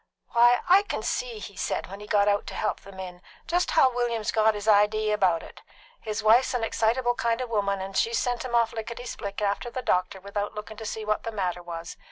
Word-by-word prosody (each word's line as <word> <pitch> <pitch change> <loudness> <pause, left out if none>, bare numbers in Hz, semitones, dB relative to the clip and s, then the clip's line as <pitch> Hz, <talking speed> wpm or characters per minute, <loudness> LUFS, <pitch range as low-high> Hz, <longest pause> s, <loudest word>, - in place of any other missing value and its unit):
"Why, 240 +1 +5
I 370 +3 +7
can 410 - -4
see," - - -2
he - - -9
said, - - -2
when 195 - -9
he 210 - -10
got 205 -1 +3
out 205 0 +1
to - - -6
help 215 - -1
them 195 -1 -13
in, 180 -1 -8 0.2
"just 350 +2 +1
how 265 -6 +4
William's 235 -3 -1
got 220 -1 +3
his 205 +1 -6
idee 215 +1 +4
about 185 -6 +2
it. - - -13 0.4
His 215 0 -4
wife's 245 +4 +5
an 240 - -1
excitable 240 +2 +1
kind 235 -1 0
of 250 -2 -4
a - - -5
woman, 200 -2 +1
and 195 0 -6
she's 230 +3 +2
sent 245 -1 -1
him 245 -2 -2
off 230 -1 +3
lickety 235 +2 -6
split 205 -3 -5
after 205 +4 -1
the 255 +1 -5
doctor 185 0 0
without 205 +2 -4
looking 210 +1 -7
to 220 -1 -6
see 220 0 -4
what 215 0 0
the 230 - -5
matter 180 -4 -2
was. 170 -1 -7
215 Hz, 240 wpm, -26 LUFS, 200-240 Hz, 0.4 s, I